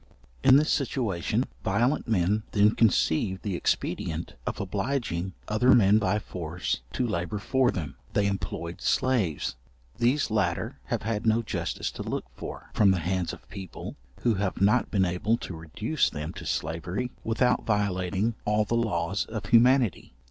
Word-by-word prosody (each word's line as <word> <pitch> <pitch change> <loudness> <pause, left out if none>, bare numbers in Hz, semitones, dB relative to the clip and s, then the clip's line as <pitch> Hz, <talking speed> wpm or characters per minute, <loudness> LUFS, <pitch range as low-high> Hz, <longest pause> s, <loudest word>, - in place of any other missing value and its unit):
In 130 - +8
this 150 +3 +4
situation 115 - 0 0.2
violent 125 +5 +1
men 105 0 +2
then 105 +1 +5
conceived 95 -3 +2
the 100 -4 -2
expedient 80 -1 -2
of - - -2
obliging 100 -3 -2
other 115 +4 +5
men 105 -1 +5
by 100 -1 +1
force 85 - -3
to 125 - 0
labour 105 -1 -2
for 130 +5 +2
them. 75 - -4 0.2
They 105 - +2
employed 85 -3 -3
slaves. 110 - +1 0.4
These 125 +2 +2
latter 95 -6 0
have - - -2
had 110 +1 -2
no 110 +1 +3
justice - - -3
to - - -7
look - - -3
for, - - -8
from 105 - +5
the 95 - +3
hands 90 +1 -1
of - - -12
people, 95 -3 -8 0.3
who 120 - +3
have 100 -2 -2
not 105 +5 +3
been 95 -3 +2
able 90 +6 +1
to 90 - -7
reduce 105 - -1
them 75 0 -5
to - - -8
slavery 90 +10 -2
without 125 +2 +2
violating 100 0 0
all 105 0 +2
the 110 - -3
laws 100 -5 0
of 110 -3 -5
humanity. 120 - +3
105 Hz, 155 wpm, -27 LUFS, 90-115 Hz, 0.4 s, In